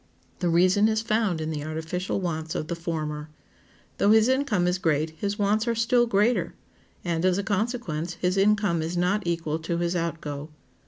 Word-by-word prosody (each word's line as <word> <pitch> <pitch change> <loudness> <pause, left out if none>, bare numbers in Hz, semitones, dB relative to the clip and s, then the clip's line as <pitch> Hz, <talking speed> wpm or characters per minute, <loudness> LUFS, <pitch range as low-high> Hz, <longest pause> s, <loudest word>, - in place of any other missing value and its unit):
The 175 - 0
reason 185 +5 +4
is 220 0 0
found 215 -6 +1
in 155 0 -3
the 150 -2 -4
artificial 160 +5 -3
wants 160 -3 -3
of 155 - -3
the 170 - -1
former. 155 -3 -4 0.7
Though 200 - +4
his 220 +1 +6
income 260 -9 +1
is 180 +1 +1
great 155 -2 +1
his 200 +6 -3
wants 210 +2 +1
are 235 - +1
still 240 +1 +3
greater, 230 +3 +1 0.5
and, 170 -1 -1
as 185 0 +3
a 200 - -1
consequence, 195 -6 -2
his 180 +1 0
income 200 -3 +2
is 165 +3 -3
not 180 +4 +1
equal 165 -2 -1
to 170 +1 -2
his 170 +1 -1
outgo. 155 -3 -3
180 Hz, 180 wpm, -26 LUFS, 160-210 Hz, 0.7 s, his